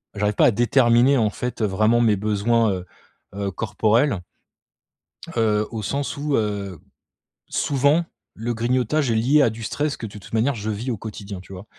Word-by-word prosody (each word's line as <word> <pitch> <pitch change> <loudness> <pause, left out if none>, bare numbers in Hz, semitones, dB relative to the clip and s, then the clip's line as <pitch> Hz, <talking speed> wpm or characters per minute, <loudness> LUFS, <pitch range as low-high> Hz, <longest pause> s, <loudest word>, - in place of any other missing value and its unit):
j'arrive 105 0 0
pas - - +4
à - - +6
déterminer, 120 +3 +4
en 110 -3 +2
fait, 125 +1 -5
heu, - - +3
vraiment 110 +4 +2
mes 110 -3 +4
besoins, 110 +2 +1
heu 90 -2 -4 0.5
heu, 100 -1 -2
corporels, 110 - +1 1.2
heu, 105 -2 +2
au 110 - -4
sens 140 +8 -3
où, 145 0 -1
heu, 100 -5 -3 0.7
souvent 145 +4 +2 0.3
le 120 +2 -2
grignotage 125 +4 0
est - - +1
lié 130 +7 +4
à 120 - +4
du 110 +1 -8
stress 145 +6 -2
que - - -6
de 105 - -8
toute 95 - -14
manière 115 +5 +2
je 110 -1 -4
vis 115 +5 -3
au 115 - -3
quotidien, 100 -2 -7
tu 95 - -13
vois? 95 +2 -9
115 Hz, 185 wpm, -22 LUFS, 105-125 Hz, 1.2 s, à